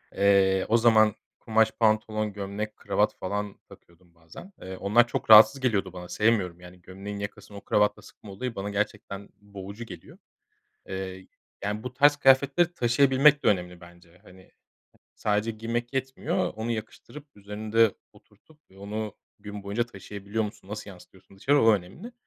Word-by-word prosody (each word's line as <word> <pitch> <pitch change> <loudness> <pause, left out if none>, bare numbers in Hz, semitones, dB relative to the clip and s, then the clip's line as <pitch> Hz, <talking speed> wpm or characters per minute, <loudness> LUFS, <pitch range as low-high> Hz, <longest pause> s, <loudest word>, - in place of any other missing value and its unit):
Eee, 95 -1 +3
o 115 - +5
zaman 110 -2 +4 0.2
kumaş 110 -1 +2
pantolon, 110 -1 0
gömlek, 100 +2 -5
kravat - - 0
falan 100 +1 -4
takıyordum 85 0 -20
bazen. 85 - -14
Eee, 95 0 -7
onlar 115 +4 +3
çok 115 - -4
rahatsız 110 +5 +9
geliyordu 100 -7 0
bana 90 -1 -9
sevmiyorum, 100 -6 +1
yani, 90 0 -14
gömleğin 100 +3 -8
yakasını 100 0 -8
o - - -9
kravatla 105 0 +1
sıkma 105 - -14
olayı 115 +5 -5
bana 100 +1 -4
gerçekten 100 -1 -4
boğucu 100 +2 -9
geliyor. - - -12 0.7
Eee, 95 0 -6 0.4
yani, 105 +2 -3
bu 125 0 -6
tarz 145 +2 +5
kıyafetleri 140 +5 +3
taşıyabilmek 135 +3 +4
de - - +1
önemli 90 -2 0
bence. 85 0 -17
Hani, 95 -1 -18 0.6
sadece 105 +1 0
giymek 115 +3 -4
yetmiyor, 135 0 -2
onu 115 +2 -4
yakıştırıp 115 +6 -7
üzerinde 105 +1 0 0.2
oturtup 155 -1 -24
ve 95 - -19
onu 105 +1 -5 0.2
gün 105 0 -8
boyunca 105 +4 -1
taşıyabiliyor 100 +1 -5
musun, 105 -2 -9
nasıl 105 -1 -7
yansıtıyorsun 95 +1 -17
dışarı 140 +7 +2
o 115 - +6
önemli. 105 - -7
105 Hz, 150 wpm, -26 LUFS, 95-115 Hz, 0.7 s, rahatsız